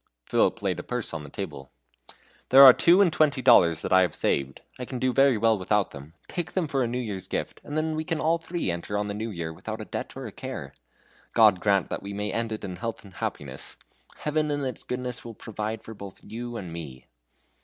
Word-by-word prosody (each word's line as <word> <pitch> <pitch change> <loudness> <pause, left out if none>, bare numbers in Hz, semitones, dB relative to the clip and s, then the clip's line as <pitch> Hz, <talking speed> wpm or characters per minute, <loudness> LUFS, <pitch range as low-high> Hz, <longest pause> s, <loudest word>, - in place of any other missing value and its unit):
Philip - - +1
laid - - 0
a - - -5
purse - - -4
upon 80 - -5
the 75 - -10
table. 75 -9 -7 0.8
"There 135 +2 +10
are 130 -2 +12
two 175 +8 +5
and 175 -4 +2
twenty 145 -3 +3
dollars 85 -10 +6
that - - 0
I 95 - +7
have 90 - +1
saved. 70 -1 0 0.2
I - - -3
can 130 - -5
do 130 +1 +1
very 135 -2 +5
well 110 -1 +3
without 100 +2 +1
them; 70 +4 -11
take 175 - -4
them 180 -4 0
for 140 -2 0
a 120 - +1
New 120 +2 -2
Year's 105 -7 -4
gift, - - -4
and 145 - -5
then 155 0 0
we 155 - -2
can 165 -1 -2
all 165 +1 +2
three 165 - -2
enter 85 +4 -3
on 105 0 -2
the - - -2
new 110 +2 -4
year 85 -5 -5
without - - -6
a - - -6
debt - - -5
or - - -6
a - - -6
care. 70 +1 -7 0.6
God 105 -5 +6
grant 100 -1 +2
that - - -3
we 100 0 -6
may 105 +1 -3
end 115 -1 -1
it 110 - -5
in 90 -2 -5
health 115 -1 -5
and 100 -2 -14
happiness! - - -5 0.4
Heaven 150 0 0
in 145 -1 -1
its 130 - -4
goodness 125 -1 -4
will 115 -2 -9
provide 110 +1 -5
for 110 - -8
both 100 -2 -10
you 120 +2 -6
and 90 -5 -7
me!" 70 -7 -8
110 Hz, 240 wpm, -26 LUFS, 95-135 Hz, 0.8 s, are